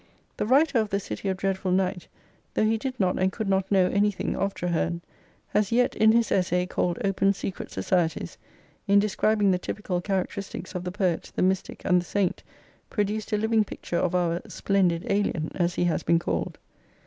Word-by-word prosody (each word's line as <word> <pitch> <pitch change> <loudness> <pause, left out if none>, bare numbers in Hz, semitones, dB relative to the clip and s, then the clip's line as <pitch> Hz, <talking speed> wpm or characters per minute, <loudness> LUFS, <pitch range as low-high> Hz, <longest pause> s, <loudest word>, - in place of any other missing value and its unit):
The - - -1
writer 275 +1 +4
of 215 -2 0
The 200 - 0
City 200 0 -4
of 190 - -1
Dreadful 190 0 -1
Night," 185 -1 0 0.5
though - - +3
he 220 +1 +2
did 260 +1 -4
not 185 -2 +1
and 190 0 +2
could 220 +1 -4
not 190 0 0
know 190 -2 +5
anything 200 +1 0
of 195 0 -1
Traherne, 170 -1 -1 0.5
has 210 0 +1
yet, 245 +1 +2
in 220 0 +5
his 230 0 +2
essay 180 -1 +2
called 175 -1 -1
" - - -4
Open 195 0 +2
Secret 195 -1 -5
Societies," 165 - -1 0.5
in 200 0 +5
describing 210 0 +2
the 180 - +1
typical 180 -2 -3
characteristics 190 -1 -3
of 180 -1 -4
the 180 - -2
Poet, 185 -4 -1
the - - +1
Mystic, 190 0 -1
and 180 -1 +4
the - - -10
Saint, 195 -2 0 0.5
produced 210 +1 -2
a 210 - +2
living 220 +1 +2
picture 175 -3 -5
of 180 0 0
our 175 -1 +1
splendid 185 -4 +1
alien," 200 -6 0
as 175 -1 0
he - - +1
has 175 -2 +1
been 170 - +3
called. 90 - -2
190 Hz, 195 wpm, -26 LUFS, 180-210 Hz, 0.5 s, know